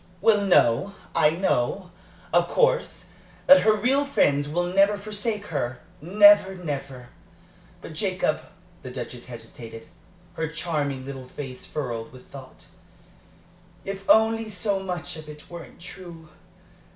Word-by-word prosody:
"Well, 210 0 +4
no. 190 0 +3 0.2
I 160 -2 +4
know, 170 +1 -1 0.4
of - - +4
course, - - +1 0.4
that 280 0 +8
her 215 - +4
real 255 +7 +2
friends 145 - +1
will 175 +4 0
never 195 +3 +3
forsake 210 +1 -3
her 130 -3 -2 0.2
never, 200 +2 +6
never! 140 -7 -6 0.7
But, - - -8
Jacob" 185 -2 -1 0.4
the 130 - -8
Duchess 125 -1 -7
hesitated, 115 +2 -11 0.4
her 160 - -2
charming 150 -4 -3
little 135 -2 -8
face 130 -2 -8
furrowed 120 -6 -4
with 130 -1 -14
thought 130 -2 -13 1.2
"if 195 0 -5
only 225 0 +4
so 200 0 0
much 180 -4 -5
of 155 -1 -10
it 150 0 -12
weren't 170 -1 -10
true. 170 -3 -11
170 Hz, 125 wpm, -25 LUFS, 135-200 Hz, 1.2 s, that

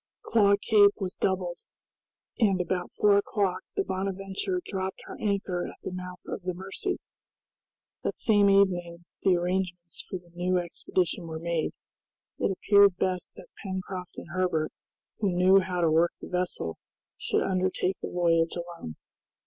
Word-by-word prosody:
Claw 200 -3 +4
Cape 205 -1 +5
was 185 -2 -3
doubled, 180 -2 -1 0.8
and 200 -5 +3
about 180 0 -1
four 205 -1 +5
o'clock 195 -3 0
the - - +1
"Bonadventure" 195 - -2
dropped 190 -1 -3
her - - -8
anchor 195 -4 -1
at - - -9
the - - -4
mouth 180 0 -7
of - - -5
the 180 0 -3
Mercy. 195 - -3 1.1
That - - -2
same 205 -3 +4
evening 175 -3 +2 0.2
the 190 -2 +4
arrangements 175 -1 -2
for 185 - -6
the 175 -1 -18
new 180 +1 +1
expedition 175 0 -1
were 160 -1 -5
made. 165 -1 -1 0.7
It - - +2
appeared 200 0 +5
best 185 -2 -1
that - - -12
Pencroft 185 -2 -5
and - - -8
Herbert, 180 -4 0 0.5
who 200 -4 +1
knew 185 +2 +6
how 185 -2 -2
to 165 -2 +3
work 165 +2 +3
the - - -9
vessel, 180 - -2 0.4
should - - 0
undertake 185 0 0
the - - -4
voyage 165 -2 +2
alone. 170 - -6
185 Hz, 150 wpm, -28 LUFS, 175-195 Hz, 1.1 s, knew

